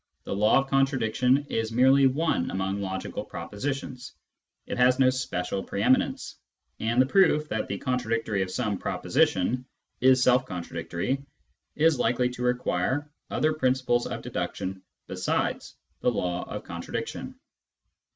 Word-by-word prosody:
The - - -4
law 105 +2 +4
of 135 0 +1
contradiction 135 0 +2
is 115 0 -1
merely 135 +3 +5
one 140 - 0
among 95 +1 -2
logical 95 -1 -4
propositions; 130 +2 -5 0.5
it - - -4
has 125 +1 +5
no 130 -1 +5
special 125 -8 -2
pre 100 - -3
eminence; 130 +3 +1 0.4
and 115 +2 0
the 130 - +6
proof 155 -1 +3
that 110 - -2
the 100 - -3
contradictory 115 -5 -1
of 95 - -1
some 105 -1 -2
proposition 120 +8 +1 0.4
is 130 0 +5
self 125 +1 +4
contradictory 85 +8 -3 0.5
is 155 -2 +3
likely 125 +2 +2
to 125 0 -8
require 125 +3 0 0.2
other 155 +1 +1
principles 130 -4 +1
of - - -5
deduction 95 0 -4 0.2
besides - - -2 0.2
the - - +2
law 90 0 -2
of - - -5
contradiction. - - -5
125 Hz, 135 wpm, -27 LUFS, 100-130 Hz, 0.5 s, the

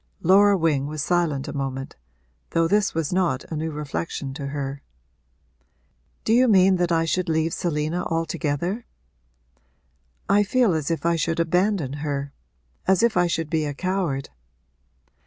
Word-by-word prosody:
Laura 200 +3 +5
Wing 150 -5 +1
was 150 0 -4
silent 165 -6 0
a - - -5
moment, 135 -2 -4 0.5
though 165 0 +2
this 205 0 +1
was 165 0 -1
not 175 -8 +1
a - - -2
new 160 +1 -2
reflection 150 -2 -4
to 140 0 -5
her. 140 -1 -4 1.4
'Do 220 - +2
you 250 +2 +5
mean 190 -3 +5
that 175 -1 0
I 165 -1 +2
should 185 +2 -1
leave 160 0 +1
Selina 160 +1 -1
altogether? 165 - -2 1.4
I 200 +1 +4
feel 225 -1 +2
as 155 -3 -1
if 165 -2 -2
I 170 0 +2
should 165 +1 -1
abandon 180 -3 +1
her 140 -2 -3 0.5
as 190 +3 +3
if 235 -2 +3
I 180 0 +3
should 165 -2 -2
be 160 -2 +1
a 145 -1 -4
coward.' 185 -6 -2
165 Hz, 155 wpm, -24 LUFS, 145-185 Hz, 1.4 s, Laura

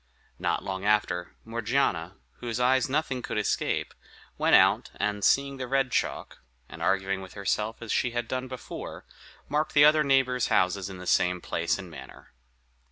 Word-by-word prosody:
Not - - -1
long 95 0 -4
after, 100 -4 0
Morgiana, 115 -6 -1 0.2
whose 120 -1 -4
eyes 130 +2 +3
nothing 135 -3 -1
could - - -4
escape, 105 - -1 0.4
went - - +4
out, - - +4
and 105 -1 -2
seeing 140 +5 +3
the 130 -1 -4
red 135 0 +1
chalk, - - -2 0.3
and - - -11
arguing 95 0 0
with 95 -1 -11
herself 105 +3 -2
as 115 - -5
she 125 - +1
had 120 -1 -3
done 130 +1 -3
before, 130 -1 -8 0.4
marked 150 +2 -1
the 145 0 +8
other 155 0 +5
neighbors' 130 -3 +2
houses 90 +1 +1
in 95 - -8
the 90 - -9
same 90 0 +2
place 85 -1 -1
and 95 -3 -9
manner. 65 -4 -12
115 Hz, 165 wpm, -27 LUFS, 95-130 Hz, 0.4 s, the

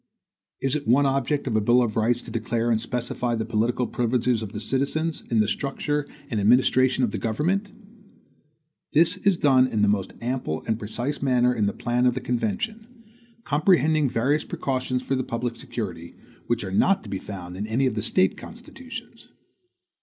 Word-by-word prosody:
Is 135 +1 0
it 145 -1 -3
one 135 +5 +4
object 140 +2 0
of 120 -5 -1
a 110 - +3
bill 120 +4 +4
of 115 -2 -2
rights 120 +2 +1
to - - -9
declare 115 +1 -1
and 110 -1 +2
specify 120 0 -2
the 110 -1 -2
political 115 +2 0
privileges 120 -1 0
of 105 -3 -6
the 105 - -5
citizens 140 +8 -1
in 115 -2 +3
the 105 - +1
structure 145 +5 -2 0.2
and 110 - 0
administration 125 +4 +4
of 115 - +1
the - - -3
government? 170 - 0 1.2
This 170 +5 +4
is 195 -2 +2
done 130 -4 +4
in 110 -4 0
the - - +5
most 100 -2 0
ample 120 -10 -3
and 110 -1 -1
precise 120 +7 -4
manner 125 -2 +3
in 105 -4 +1
the - - +1
plan 125 +1 +1
of 125 - +2
the - - -1
convention; 125 - -2 0.6
comprehending 155 - +3
various 135 +7 +1
precautions 130 -1 -2
for - - -2
the 130 -1 0
public 115 0 -3
security, 85 -10 -6 0.3
which 120 -1 0
are 95 - -5
not 190 - +3
to - - -10
be 95 - -3
found 90 -3 -7
in 100 +3 -4
any 120 +5 +1
of 130 - +1
the 110 - -2
State 95 -4 +2
constitutions. 250 +3 -10
125 Hz, 185 wpm, -25 LUFS, 110-140 Hz, 1.2 s, the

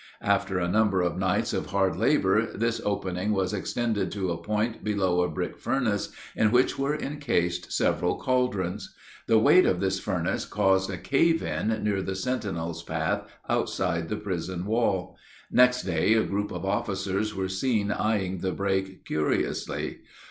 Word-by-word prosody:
After 95 - +1
a 90 -1 0
number 100 0 +2
of 90 -1 0
nights 95 -1 +1
of - - -2
hard 95 0 +1
labor, - - +3
this 115 +2 0
opening 100 0 -1
was 95 -1 0
extended 105 -1 -1
to 95 -3 -1
a 85 0 -4
point 110 +4 -1
below 95 -4 +1
a 90 - +1
brick - - -4
furnace 110 -6 0 0.3
in 110 -1 +3
which 125 +2 +3
were 140 +2 +1
incased 115 - -1
several - - +1
caldrons. 105 -7 -1 0.3
The 115 - +5
weight 180 +11 +6
of 90 - +1
this 95 0 0
furnace 90 -5 -1
caused 95 0 +2
a 95 - -3
cave 165 - +2
in 110 +1 -1
near 100 -2 +1
the 95 0 -3
sentinel's 95 -8 -3
path 80 -1 -2 0.2
outside 85 0 -1
the 105 - -2
prison 90 -3 -4
wall. 100 -4 0 0.3
Next 125 0 +5
day, 90 +4 +2
a 110 - +3
group 105 +1 -2
of 90 +1 -5
officers 100 0 -1
were 95 0 -1
seen 105 +1 0
eying 100 -4 0
the 95 +1 -1
break 95 -1 -2
curiously. 75 0 -1
100 Hz, 160 wpm, -27 LUFS, 90-110 Hz, 0.3 s, weight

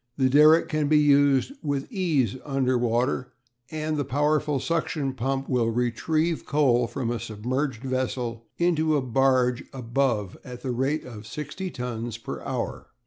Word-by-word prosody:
The 130 -2 +2
derrick 155 +3 +6
can 155 -2 0
be 155 +1 +4
used 145 - +4
with 140 -2 -2
ease 160 - +1
under 135 -3 0
water, 125 +2 0 0.4
and 155 0 -2
the 145 - 0
powerful 150 +2 +1
suction 150 -3 -1
pump 135 +2 -2
will 120 -3 +1
"retrieve" 155 +8 0
coal 125 -5 +2
from 120 -2 -3
a 120 - -2
submerged 120 +3 -3
vessel 125 -3 -2
into 160 -3 +2
a - - +1
barge 130 0 +2
above 120 -5 -1
at 125 -2 -9
the 130 - -2
rate 135 +5 -1
of 110 -4 -9
sixty 150 +8 -5
tons 120 -5 -5
per 115 - -7
hour. - - -4
135 Hz, 150 wpm, -26 LUFS, 120-150 Hz, 0.4 s, derrick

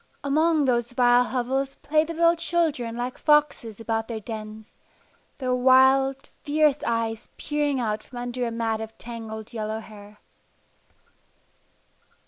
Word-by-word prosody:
Among 310 +2 +2
those 240 -2 0
vile 245 -1 +4
hovels 260 +3 -2
played 310 +1 +1
the 335 - -5
little 335 +1 +4
children 325 -9 -1
like 245 +1 -4
foxes 295 -8 +2
about 225 -1 -2
their 230 -2 -4
dens, 215 0 -8 0.6
their 255 -2 -1
wild, 265 +1 +4
fierce 300 -1 +1
eyes 230 -1 -2
peering 295 -2 -1
out 215 -3 -1
from 245 - -13
under 245 0 -3
a - - -2
mat 225 -1 -2
of 220 0 -8
tangled 225 -2 -8
yellow 220 -1 -3
hair. 210 -1 -13
245 Hz, 130 wpm, -25 LUFS, 225-280 Hz, 0.6 s, vile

